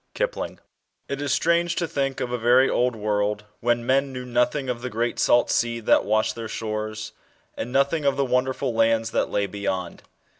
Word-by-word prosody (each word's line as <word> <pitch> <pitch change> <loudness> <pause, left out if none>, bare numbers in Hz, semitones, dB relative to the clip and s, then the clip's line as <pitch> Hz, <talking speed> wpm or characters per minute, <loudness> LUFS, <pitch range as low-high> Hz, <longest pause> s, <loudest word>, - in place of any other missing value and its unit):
KIPLING. - - -3 0.5
IT 140 - -3
i^ 145 0 -2
strange 170 +4 +2
to 170 - -1
think 135 -3 -2
of 120 - -2
a 125 - 0
very 125 +3 +5
old 125 -1 +1
world, 105 0 -1 0.2
when 120 0 0
men 135 +2 +2
knew 125 -1 -6
nothing 125 +3 0
of 125 -2 -3
the 125 - -4
great 120 +1 -2
salt 120 - +3
sea 115 0 +1
that 110 - +3
washed 110 +1 +1
their 115 -1 -6
shores, 110 0 -4 0.4
and 120 - -5
nothing 140 +4 +2
of 140 -1 +2
the 140 - +2
wonder 125 +1 +1
ful 120 - -2
lands, 115 0 +2
that - - 0
lay 100 - 0
beyond. 95 -3 -4
120 Hz, 195 wpm, -24 LUFS, 110-135 Hz, 0.5 s, very